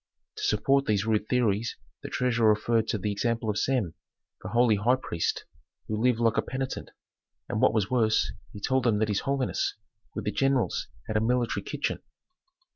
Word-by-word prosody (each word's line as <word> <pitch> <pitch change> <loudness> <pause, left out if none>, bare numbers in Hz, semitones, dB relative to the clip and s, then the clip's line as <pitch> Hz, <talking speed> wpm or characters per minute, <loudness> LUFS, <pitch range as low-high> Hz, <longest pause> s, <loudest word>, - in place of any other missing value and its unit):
To 425 - -5
support 140 - +2
these 105 -1 +1
rude 110 -1 0
theories 115 -3 +1 0.2
the - - -6
treasurer 115 -3 +2
referred 110 +1 +2
to - - 0
the 105 +1 -2
example 115 +1 0
of 105 - -2
Sem, 120 -11 0 0.5
the - - -6
holy 120 -3 +4
high 120 +6 +3
priest, 85 -10 -2 0.4
who 110 0 -2
lived 125 -1 +3
like 115 -1 +2
a - - +4
penitent, 130 0 -4 0.6
and - - -2
what - - +5
was 105 0 +1
worse, 110 -4 +2 0.2
he 105 - -9
told 130 +4 +1
them 115 -3 +3
that 110 0 +1
his 100 - +1
holiness, 135 -2 0 0.4
with - - -4
the 105 - 0
generals, 135 +4 +1 0.2
had 110 - -1
a - - +2
military 120 +1 +1
kitchen. - - -2
115 Hz, 185 wpm, -28 LUFS, 105-125 Hz, 0.6 s, what